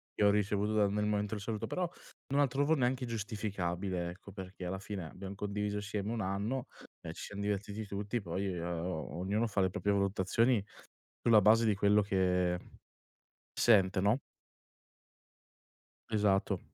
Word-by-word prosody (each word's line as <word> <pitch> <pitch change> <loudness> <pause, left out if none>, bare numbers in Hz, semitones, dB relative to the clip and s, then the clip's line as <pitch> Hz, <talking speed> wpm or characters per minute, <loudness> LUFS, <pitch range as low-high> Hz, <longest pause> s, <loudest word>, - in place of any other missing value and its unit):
che - - +1
ho - - +7
ricevuto 105 +1 +1
dal 105 -2 +3
nel 105 0 0
momento 105 0 0
del 100 - -6
saluto, 110 0 -3
però, 180 - -1 0.4
non 145 - +3
la 145 - +5
trovo 140 +4 +2
neanche 125 -2 +1
giustificabile 100 -5 -2
ecco, 95 +2 -12
perché 95 -1 -7
alla 95 +2 -2
fine 100 -3 -5
abbiam 95 +1 -7
condiviso 105 +1 -2
assieme 105 0 -3
1 115 -2 -2
anno 100 +7 -2 0.3
e 80 - -6
ci - - -8
siam 100 0 -7
divertiti 105 +1 -2
tutti, 100 +4 -3
poi, 95 +1 -2
o 85 -1 -3
ognuno 105 +5 0
fa 100 -2 0
le 95 - +3
proprie 100 +1 0
valutazioni 100 +4 +2 0.6
sulla 110 -3 +6
base 110 +3 +5
di 105 - +3
quello 105 +1 +4
che 90 -2 +1 1.0
sente, 95 -4 +5
no? 105 +6 +3 1.9
Esatto. 105 -3 +2
100 Hz, 155 wpm, -33 LUFS, 95-110 Hz, 1.9 s, ho